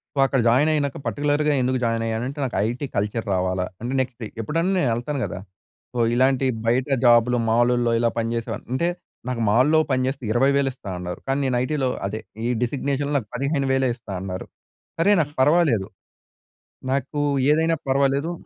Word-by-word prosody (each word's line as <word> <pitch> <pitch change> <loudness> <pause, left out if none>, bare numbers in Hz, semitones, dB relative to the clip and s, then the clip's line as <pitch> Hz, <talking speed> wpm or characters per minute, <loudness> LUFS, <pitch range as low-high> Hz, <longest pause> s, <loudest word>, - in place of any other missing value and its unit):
So, - - -12
అక్కడ 135 0 +1
join 130 +7 +4
అయినాక 145 -3 -1
పార్టిక్యులర్‌‌గా 145 +1 +1
ఎందుకు 130 +1 +1
జాయిన్ 115 -1 0
అయ్యానంటే, 120 +6 -3
నాకు 125 - -4
ఐటీ 120 +5 -3
కల్చర్ 105 +3 -1
రావాలా. 90 0 0 0.2
అంటే, 120 +3 -3
నెక్స్టే 125 -3 -5
ఎప్పుడన్నా 165 - 0
నేను 140 - +2
ఎళ్తాను 135 +5 -3
గదా! 90 - -6 0.5
సో, 125 - -3 0.2
ఇలాంటి 130 +1 +3 0.2
బయట 125 +4 +2 0.2
జాబ్‌లు 120 +1 +5
మాలులో 120 +1 +3
ఇలా 115 - +2
పనిచేసేవా 115 -1 -2 0.2
అంటే, 170 +6 +1 0.4
నాకు 125 -2 -2
మాల్‌లో 130 +8 +4
పనిజెస్తే 130 +1 -1
20,000 135 +2 +3
ఇస్తా 115 -6 -10
అన్నారు. 90 0 -5
కానీ, 135 +1 +1
నేను 130 -2 +1
ఐటీ‌లో 135 -1 0 0.2
అదే, 110 +3 -5 0.3
ఈ - - 0
డిజిగ్నేషన్‌లో 140 +3 -1
నాకు 105 -5 -12
15,000 135 -1 +1
ఇస్తా 110 -4 -11
అన్నారు. 95 -1 -5 0.5
సరే 200 +5 +4
నాకు 145 -1 -4
పర్వాలేదు. 140 - +3 1.0
నాకు 140 +2 -1 0.3
ఏదైనా 160 +2 +2
పర్వాలేదు. 140 +4 +1
130 Hz, 155 wpm, -23 LUFS, 115-140 Hz, 1.0 s, జాబ్‌లు